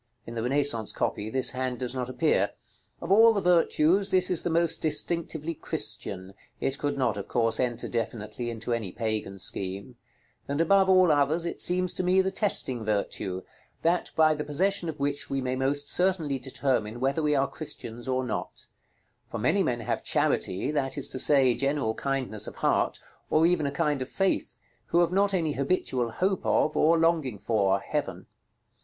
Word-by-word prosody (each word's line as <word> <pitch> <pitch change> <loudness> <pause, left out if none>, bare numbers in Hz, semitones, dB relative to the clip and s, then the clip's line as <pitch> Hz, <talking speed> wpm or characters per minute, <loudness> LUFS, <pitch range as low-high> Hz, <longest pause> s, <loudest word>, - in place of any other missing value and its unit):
In 115 - -8
the 115 - -3
Renaissance 125 -3 +1
copy 105 +1 -2
this 130 +1 +2
hand 130 -1 -3
does 125 0 -1
not 125 -1 -3
appear. 130 - +1 0.5
Of 170 - -4
all 225 +3 +7
the 205 - 0
virtues, 180 +1 +3
this 185 -1 +3
is 175 - +3
the - - -2
most 170 0 +1
distinctively 160 0 0
Christian 95 - -4 0.3
(it 135 +1 -2
could 145 -1 -2
not, 130 -5 0
of 100 - -6
course, 115 -2 +1
enter 120 -2 -1
definitely 115 0 -4
into 115 +1 -4
any 110 -6 -3
Pagan 110 -3 -3
scheme); 95 +5 -5 0.5
and 140 +1 -2
above 190 +3 +4
all 185 -3 +5
others, 150 +3 +2
it 170 - -4
seems 180 0 +2
to 185 - -1
me 180 +1 +3
the 190 0 +1
testing 155 - +1
virtue, 100 -3 -2 0.4
that 175 +2 +1
by 155 -1 +4
the 150 0 -4
possession 180 +4 0
of 150 - -7
which 145 +1 -2
we 135 - -1
may 130 -1 -2
most 140 +2 0
certainly 175 -7 +1
determine 120 -4 -2
whether 135 +5 0
we 150 -1 +1
are 135 0 +2
Christians 120 -6 -7
or 130 0 0
not; 120 -4 -5 0.6
for - - -5
many - - +1
men - - -1
have - - -3
charity, 95 +10 0
that 140 -2 -1
is 140 0 +1
to 130 - -2
say, 135 -3 +5
general 135 -3 -1
kindness 130 -5 -3
of - - -8
heart, - - 0 0.3
or 160 +1 +3
even 170 -4 +2
a - - -2
kind 145 0 -1
of 130 - -4
faith, 195 -1 -1 0.3
who 170 - +3
have 175 - +1
not 200 +2 +2
any 170 -5 0
habitual 135 -4 -1
hope 185 - -1
of, 155 - +1
or 165 +2 +4
longing 160 -8 +1
for, 100 -2 +1
heaven. 100 - -4
140 Hz, 185 wpm, -27 LUFS, 120-170 Hz, 0.6 s, all